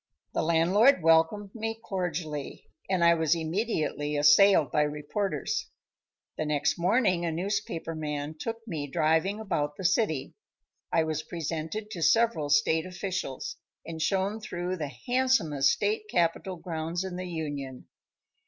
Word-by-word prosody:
The - - 0
landlord 180 - +4
welcomed 165 +5 +3
me 225 0 -4
cordially, 170 -8 -4 0.2
and 185 -3 +2
I 170 0 +7
was 160 -1 +2
immediately 160 -4 -1
assailed 150 0 +6
by 150 - +2
reporters. 170 - -2 0.7
The 155 - 0
next 150 +1 0
morning 185 -1 +2
a 170 - 0
newspaper 175 -1 -3
man 150 -1 -4
took 230 0 -5
me 155 -7 -4
driving 160 +8 +1
about 160 -9 -2
the 190 - -6
city. 170 - +1 0.6
I 165 - +3
was 155 -1 -2
presented 165 +6 -5
to 175 - -6
several 225 -5 +3
state 160 +3 +3
officials, 180 -6 -4 0.3
and 160 -1 -6
shown 195 +5 0
through 180 -3 -4
the 150 -4 -4
handsomest 245 - +2
state 210 +1 0
capitol 175 +1 0
grounds 165 +1 -3
in 190 -2 -5
the 185 0 -5
Union. 145 -6 -5
170 Hz, 135 wpm, -28 LUFS, 155-195 Hz, 0.7 s, I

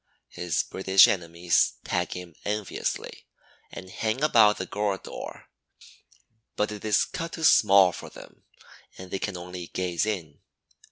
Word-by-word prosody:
His 90 -2 -2
British 95 0 +5
enemies 85 -1 +1
tag 90 -1 -2
him 90 -2 -9
enviously 105 -1 -4 0.4
and 95 0 -10
hang 115 +8 -2
about 110 -8 +5
the - - -4
gourd 105 -2 -2
door; - - -9 1.1
but 105 +1 -1
it 105 -1 -8
is 110 -1 +2
cut 165 0 -6
too 165 - -6
small 100 - +6
for - - -9
them - - -14 0.6
and 95 0 -10
they 95 - -2
can 95 -2 -4
only 90 0 -8
gaze 90 +2 -2
in. 85 -9 -4
95 Hz, 145 wpm, -26 LUFS, 90-105 Hz, 1.1 s, small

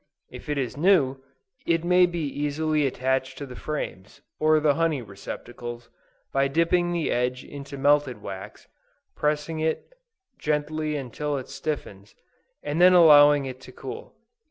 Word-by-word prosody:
If - - -10
it 150 - -1
is 130 -1 -3
new, 145 -6 +3 0.5
it 165 -1 +2
may 180 +1 +5
be 175 -1 -4
easily 150 +1 0
attached 130 0 -1
to 140 - -5
the 125 -2 -10
frames, 105 -11 -6 0.2
or 155 0 +4
the 150 -1 +3
honey 160 -4 0
receptacles, 120 +4 -8 0.4
by 135 0 +3
dipping 170 +4 +1
the 170 -2 -1
edge 125 +1 -1
into 140 0 -9
melted 145 -3 +2
wax, 95 -2 -9 0.5
pressing 150 +2 -1
it 160 - -2 0.5
gently 150 +1 -1
until 145 +2 -3
it 130 - -7
stiffens, 105 -10 -6 0.5
and 150 +4 -1
then 185 +1 +8
allowing 145 -4 +7
it 130 -1 -7
to - - -12
cool. - - -9
145 Hz, 145 wpm, -25 LUFS, 130-155 Hz, 0.5 s, then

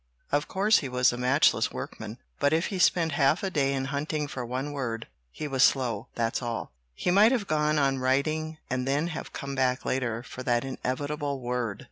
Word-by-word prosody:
Of 145 +1 +1
course 205 +3 +3
he 140 - -5
was 125 0 +3
a - - -3
matchless 130 +4 +3
workman. - - -7 0.2
But 145 - +3
if 165 +2 +2
he 190 - -2
spent 170 -2 +3
half 145 +5 +2
a 190 - -1
day 140 -5 +1
in 135 -1 -1
hunting 150 +1 -1
for 130 -2 -5
one 130 +4 -3
word, 115 -5 -3 0.2
he 150 - -5
was 135 -2 0
slow, 125 -4 +3
that's 115 +1 -1
all. 120 -2 -4 0.2
He 180 - 0
might 210 +5 +6
have 240 -6 +1
gone 150 -2 +1
on 135 -2 +2
writing 155 +5 0
and 125 0 -2
then 145 +5 +1
have 155 - -6
come 140 0 -5
back 130 -1 0
later 120 -3 -1
for 130 - -8
that 120 -1 +1
inevitable 140 +2 -3
word." 120 -4 -2
135 Hz, 200 wpm, -28 LUFS, 125-155 Hz, 0.2 s, might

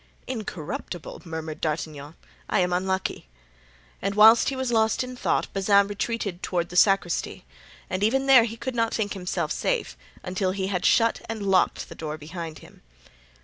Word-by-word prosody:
"Incorruptible!" 180 - -6
murmured 160 -1 -6
D'Artagnan; 155 -1 -4 0.3
"I - - +2
am 180 0 +1
unlucky;" 190 - -2 0.7
and 195 +1 -2
whilst 220 +2 +7
he 270 - -3
was 260 -2 -2
lost 220 +1 +2
in 255 0 -7
thought - - -1
Bazin 200 +1 +4
retreated 205 -2 -3
toward 175 -2 -1
the 180 - -9
sacristy, 180 - +2 0.4
and 185 +2 -2
even 265 +5 +2
there 260 -4 +7
he 230 0 -6
could 260 +2 -4
not 230 -1 0
think 205 -2 -1
himself 180 -3 -3
safe - - -1 0.3
until 185 0 -1
he 190 -1 -2
had 180 -3 -1
shut 230 -1 +3
and 220 -3 -4
locked 190 -2 +2
the - - -10
door 155 -1 -5
behind 160 +1 -7
him. - - -18
195 Hz, 165 wpm, -25 LUFS, 175-225 Hz, 0.7 s, whilst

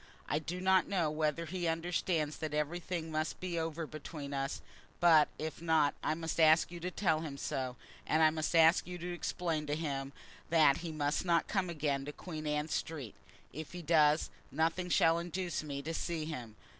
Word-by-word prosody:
I 150 - +1
do 175 +4 -5
not 190 0 +4
know 175 -6 +1
whether 155 +1 0
he 175 +1 -3
understands 165 -2 0
that 155 -1 -3
everything 165 +2 -2
must 155 0 -2
be 175 -2 -2
over 165 0 -3
between 150 -1 -7
us; 135 +1 -2 0.4
but, 160 -3 +6
if 160 0 -5
not, 160 -3 +3
I 155 - +1
must 165 0 -3
ask 160 +1 +5
you 175 - -7
to 180 +2 -3
tell 175 -4 +1
him 145 -4 -5
so. 130 -2 -3 0.3
And 160 +1 +3
I 155 - +6
must 155 +1 -2
ask 165 +1 +6
you 180 0 -5
to 175 +1 -5
explain 165 -3 -2
to 145 - 0
him 140 -4 -3 0.4
that 155 -4 +5
he 170 -1 -5
must 150 -1 0
not 170 -2 +2
come 190 -3 0
again 145 -4 -1
to 145 - -4
Queen 155 -1 -7
Anne 150 +1 -1
Street. 145 -8 -3 0.4
If 155 +4 -7
he 175 -1 -6
does, 155 -1 +4 0.2
nothing 165 +4 0
shall 165 -1 +4
induce 175 +1 -3
me 140 -2 -5
to 165 +3 -3
see 165 -1 -2
him. 125 -9 -6
160 Hz, 195 wpm, -33 LUFS, 150-170 Hz, 0.4 s, but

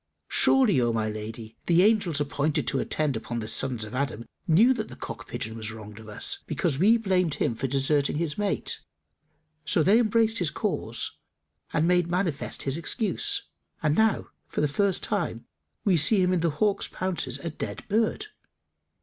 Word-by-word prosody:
Surely, 240 - +4
O 120 -1 +2
my 110 -1 0
lady, 110 +1 -7
the 175 +1 +5
angels 200 -8 +3
appointed 145 +1 0
to 135 - +1
attend 150 -1 0
upon 120 +2 -4
the 110 -2 -4
sons 110 +1 0
of 105 - -7
Adam, 130 -4 -2 0.2
knew 215 +11 +6
that 220 -3 -4
the - - -10
cock - - -8
pigeon 110 +1 -4
was 110 -1 -4
wronged 105 -1 -10
of 110 -1 -11
us, 105 - 0
because 135 - -1
we 220 +6 +5
blamed 185 -7 +1
him - - 0
for 120 +4 -3
deserting 140 +2 +1
his 155 -2 -1
mate; 205 -1 -1 0.8
so 160 +1 +2
they 205 +8 +5
embraced 225 0 +2
his 175 -4 +2
cause 155 - -3 0.5
and 155 +2 +2
made 180 -1 +3
manifest 175 -5 -1
his 135 +2 +1
excuse; 245 - 0 0.4
and 150 -1 +3
now 220 +1 +2 0.2
for - - -4
the 150 - +3
first 195 +6 0
time - - -2 0.4
we 195 -4 +4
see 170 +7 +5
him 180 0 +3
in 180 - +2
the 165 0 +1
hawk's 200 +7 0
pounces 165 -9 -3
a 160 +4 -5
dead - - -6
bird." 220 - +1
160 Hz, 180 wpm, -26 LUFS, 130-200 Hz, 0.8 s, knew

